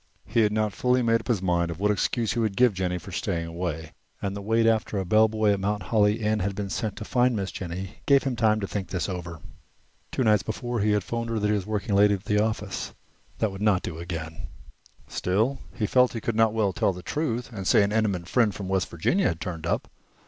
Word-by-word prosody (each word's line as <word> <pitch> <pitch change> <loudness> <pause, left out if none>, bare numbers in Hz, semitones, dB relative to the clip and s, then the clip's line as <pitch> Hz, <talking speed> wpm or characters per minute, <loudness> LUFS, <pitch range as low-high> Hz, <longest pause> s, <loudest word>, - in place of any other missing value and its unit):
He - - 0
had 105 -2 +4
not 105 -1 0
fully 125 +5 +2
made 115 0 +3
up - - -15
his 110 -7 0
mind 85 -2 +1
what 105 +3 +2
excuse 110 +3 0
he 120 - -2
would 110 -4 0
give 125 -3 +5
Jennie 90 -1 -1
for 90 +3 -10
staying 85 -2 -2
away, 85 -2 -4 0.3
and 100 0 -3
the 100 - -5
wait 115 +3 +2
after 110 -2 +1
a 95 - -1
bellboy 110 +1 +3
at 100 - +1
Mount 105 +2 -1
Holly 105 0 +2
Inn 110 0 +1
had 100 0 -2
been 100 -1 -4
sent 110 -4 -2
to 105 - -7
find 125 +1 +2
Miss 100 -2 -2
Jennie 95 +1 -6
gave 140 -2 +5
him 130 -3 -1
time 110 -2 +3
to 100 - -2
think 100 -1 -4
this 90 -5 -2
over. 85 -4 -6 0.7
Two 130 - 0
nights 105 -2 +4
before 120 +2 -3
he 105 +1 +2
had 105 -2 +1
'phoned 115 +3 -3
her 115 - -1
that 105 - -1
he - - +3
was 100 -2 -2
working 105 -1 -2
late 100 +1 +6
at 100 0 -1
the 105 0 +2
office. 105 -3 -3 0.4
That 110 - 0
would 95 +1 -8
not 105 -4 +3
do 80 -2 -5
again. 80 -2 -6 0.6
Still, 110 +9 0 0.2
he 105 - -1
felt 125 +4 +3
that - - -4
he - - -5
could 115 - -2
not 115 0 +4
well 105 -4 +1
tell 95 - +1
the 90 0 -9
truth 125 -6 -2
and 95 -3 -4
say - - +5
an 100 - 0
intimate 100 -5 0
friend 115 -1 +2
from 100 - -5
West 95 -1 0
Virginia 130 - +1
had 80 - -2
turned 85 -3 -5
up. - - -1
105 Hz, 245 wpm, -26 LUFS, 95-110 Hz, 0.7 s, late